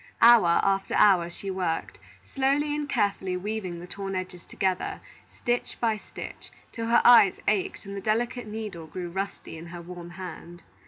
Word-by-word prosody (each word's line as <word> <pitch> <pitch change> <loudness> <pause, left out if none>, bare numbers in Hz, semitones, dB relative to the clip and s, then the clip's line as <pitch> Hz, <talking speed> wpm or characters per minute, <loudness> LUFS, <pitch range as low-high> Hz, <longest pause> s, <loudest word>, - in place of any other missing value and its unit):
Hour 230 -8 +7
after 195 0 +1
hour 180 -4 +5
she 195 +3 -6
worked, 180 -3 -2 0.3
slowly 280 +2 +1
and 295 -1 -3
carefully 200 -5 0
weaving 190 -3 -4
the 175 - -8
torn 195 +1 -5
edges 185 -1 -6
together, 185 -1 -1 0.3
stitch 240 -1 -2
by 225 -2 +1
stitch, - - -10 0.2
till 230 -1 -4
her 235 - +4
eyes 230 -6 +7
ached 205 -2 0
and 200 0 -7
the 195 - -5
delicate 230 +3 -1
needle 210 -7 -6
grew 175 +1 -6
rusty 195 -3 -5
in 170 - -9
her 170 0 -8
warm 175 0 -9
hand. 175 -1 -9
195 Hz, 165 wpm, -27 LUFS, 180-220 Hz, 0.3 s, Hour